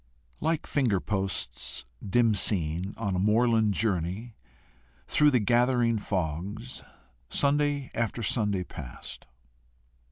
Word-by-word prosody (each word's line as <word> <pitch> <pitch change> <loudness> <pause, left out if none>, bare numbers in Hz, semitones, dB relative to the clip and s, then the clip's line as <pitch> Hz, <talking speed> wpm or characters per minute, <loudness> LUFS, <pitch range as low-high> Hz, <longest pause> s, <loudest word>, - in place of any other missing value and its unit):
Like 160 0 0
finger 120 -9 +1
posts 95 - -3 0.2
dim 115 +2 +3
seen, 90 -2 +1
on 100 -4 -1
a - - 0
moorland 110 0 +3
journey, 100 +2 -1 0.7
through 150 0 +4
the 130 -4 +3
gathering 120 0 +2
fogs, 100 +6 -3 0.5
Sunday 145 -1 +1
after 115 0 -2
Sunday 105 -5 0
passed. 70 -8 -9
110 Hz, 100 wpm, -28 LUFS, 95-120 Hz, 0.7 s, through